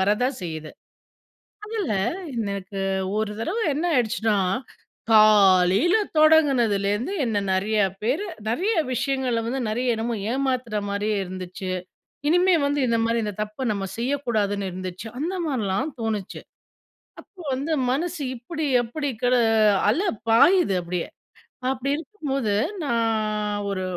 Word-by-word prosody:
வரத்தான் 230 +7 +1
செய்யுது. 160 -2 -6 0.9
அதில 425 - -2 0.4
எனக்கு 200 -3 -3 0.4
ஒரு 215 -1 -1
தரவ 360 - -2 0.2
என்ன 315 +4 -2
ஆயிடுச்சுனா, 225 -3 +1 0.8
காலையில 205 - +6 0.2
தொடங்குனதுலேருந்து 250 - +3
என்ன 215 -3 0
நெறைய 210 +3 +1 0.2
பேர் 260 - 0 0.3
நெறைய 385 - 0 0.2
விஷயங்கள 255 -2 0
வந்து 260 +3 -2
நெறைய 245 +1 0
என்னமோ 230 +1 -2 0.2
ஏமாத்துற 255 -5 -1
மாரியே 205 +1 -1
இருந்துச்சு. 185 0 -6 0.6
இனிமே 355 +3 +4
வந்து 285 0 0
இந்த 230 - +2
மாரி 230 +1 +1
இந்த 210 -1 -3
தப்பு 215 +4 -9
நம்ம 200 -2 -2
செய்யக்கூடாதுன்னு 230 -6 -1
இருந்துச்சு. 185 +3 -6
அந்த 335 +7 -2
மாதிரிலாம் 255 0 -1
தோணுச்சு. 215 -4 -3 0.8
அப்போ, 385 -4 -14
வந்து 285 +5 -2 0.2
மனசு 325 +3 -2
இப்டி, 310 +6 -5 0.2
எப்டி 280 +5 -3
கட 250 0 +3 0.5
அல 310 - +2 0.3
பாயுது 290 - +5
அப்டியே 175 0 -3 0.6
அப்டி 265 +1 -2
இருக்கும்போது 280 - -3 0.3
நான் 215 -4 0
ஒரு 190 -1 -2
230 Hz, 115 wpm, -24 LUFS, 205-280 Hz, 0.9 s, காலையில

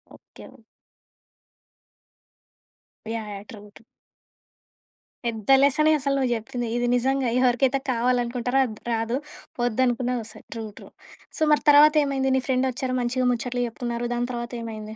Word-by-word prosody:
Okay. - - -15 2.7
Yeah! 220 -2 -5
Yeah! 200 0 -8
True. 215 - -10 0.2
True. - - -19 1.4
పెద్ద 225 -2 -4
లెసనే 305 +3 +4
అసలు 275 0 0
నువ్వు 260 -2 0
చెప్పింది 235 +2 -4
ఇది 245 0 0
నిజంగా 265 0 +1
ఎవరికైతే 255 +2 +2
కావాలనుకుంటారో 245 +1 0
అది 220 -4 -7 0.2
రాదు 225 +2 -1 0.5
వద్దనుకున్నది 245 +1 0
వస్తయి. 220 0 -12
ట్రూ. 225 -1 -5
ట్రూ. - - -12 0.5
సో, - - -9
మరి 300 - +1
తర్వాత 300 +1 +7
ఏమైంది? 270 -1 0
నీ 260 - 0
ఫ్రెండొచ్చారు 255 0 0
మంచిగా 250 +1 0
ముచ్చట్లు 245 +1 -2
చెప్పుకున్నారు. 240 +1 -4
దాని 240 +1 -1
తర్వాతేమైంది? 230 -3 -6
245 Hz, 125 wpm, -24 LUFS, 235-260 Hz, 2.7 s, తర్వాత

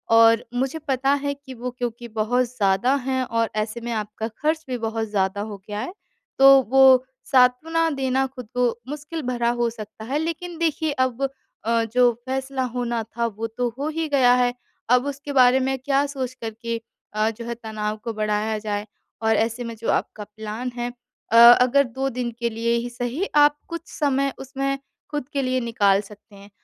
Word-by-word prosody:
और 230 0 +6
मुझे 265 +5 -1
पता 270 0 +1
है 285 0 0
कि 280 -2 -12
वो 250 +1 -5
क्योंकि 240 -1 -4
बहुत 225 +3 +1
ज़्यादा 230 +1 +1
हैं 260 -1 0
और 230 -1 0
ऐसे 215 +2 -5
में 235 +1 -4
आपका 215 0 -3
खर्च 310 +8 -1
भी 250 - -1
बहुत 225 0 -2
ज़्यादा 195 -1 0
हो 205 - -7
गया 210 -1 -4
है 255 +11 -4 0.5
तो 270 0 +9
वो 265 -1 +7 0.3
सांत्वना 300 +6 +3
देना 265 -1 0
खुद 255 -3 -10
को 250 -1 +3 0.2
मुश्किल 300 +3 -5
भरा 240 -2 +1
हो 240 -1 0
सकता 220 -1 -10
है, 275 +5 -1
लेकिन 335 +2 -4
देखिए 315 -2 0
अब 255 +1 -4 0.4
अ, 230 0 +2
जो 245 +2 +3
फ़ैसला 265 0 -2
होना 240 -2 -1
था 230 +2 -3
वो 225 +1 -4
तो 245 +2 -2
हो 285 - -1
ही 320 +1 -2
गया 260 -4 +5
है। 245 -1 +2 0.4
अब 250 +2 +4
उसके 285 +1 -5
बारे 255 -1 +6
में 265 +1 0
क्या 275 +2 +1
सोच 260 -3 -4
कर 230 -3 -5
के 230 -1 -3 0.3
अ, 215 +1 +2
जो 230 +1 -7
है 235 0 -4
तनाव 215 -2 -4
को 230 -1 -3
बढ़ाया 215 0 -1
जाए 210 -1 -3 0.4
और 220 0 +3
ऐसे 230 +3 0
में 230 0 -6
जो 225 - -4
आपका 210 - -2
प्लान 220 +4 -6
है 240 0 -2 0.4
अ, 230 - +5 0.2
अगर 260 +3 +4
2 265 +2 -3
दिन 245 -1 -3
के 235 0 0
लिए 230 +1 0
ही 235 +1 -3
सही 245 +8 -3
आप 295 0 +5
कुछ 335 0 -4 0.2
समय 275 -2 +1
उसमें 275 +1 -2 0.3
खुद 295 -4 -3
के 280 - +1
लिए 255 0 +1
निकाल 205 -4 +2
सकते 210 +1 -16
हैं, 200 +1 -14
245 Hz, 195 wpm, -23 LUFS, 225-270 Hz, 0.5 s, तो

